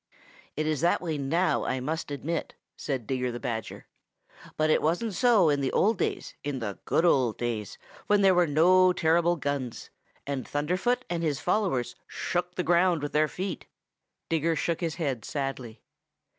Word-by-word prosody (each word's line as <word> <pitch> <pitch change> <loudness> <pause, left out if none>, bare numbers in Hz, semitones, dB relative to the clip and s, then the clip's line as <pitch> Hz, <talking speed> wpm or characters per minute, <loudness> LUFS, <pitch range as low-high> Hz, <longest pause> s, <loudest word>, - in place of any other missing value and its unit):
"It 155 - -1
is 155 -3 0
that 170 - +3
way 160 -4 -3
now, 165 +7 +1
I 130 - -1
must 155 +5 -3
admit," 150 +3 -4 0.2
said 130 -6 -3
Digger 125 0 -1
the 120 - -6
Badger, 115 -2 -5 0.7
"but 155 0 +2
it - - +3
wasn't 175 +8 0
so 215 -4 +4
in 145 -1 +1
the 135 - 0
old 215 0 +2
days, - - -2
in 145 -1 -3
the 105 -5 -5
good 165 - +2
old 130 -9 +3
days 115 -4 -3 0.3
when 205 -1 +3
there 190 -1 +6
were 175 -1 +3
no 180 +5 +5
terrible 170 +1 +2
guns, 140 -5 -4 0.3
and 140 -2 -4
Thunderfoot 185 - 0
and 170 -1 -2
his 150 -4 -1
followers 175 - 0
shook 180 0 -3
the 180 - -1
ground 175 -2 +3
with 145 - -3
their 155 +1 +3
feet." 185 +2 -5 0.6
Digger 165 0 +1
shook 170 +2 -1
his 165 -3 -2
head 135 -9 -2
sadly. 135 -5 -5
155 Hz, 170 wpm, -27 LUFS, 135-175 Hz, 0.7 s, there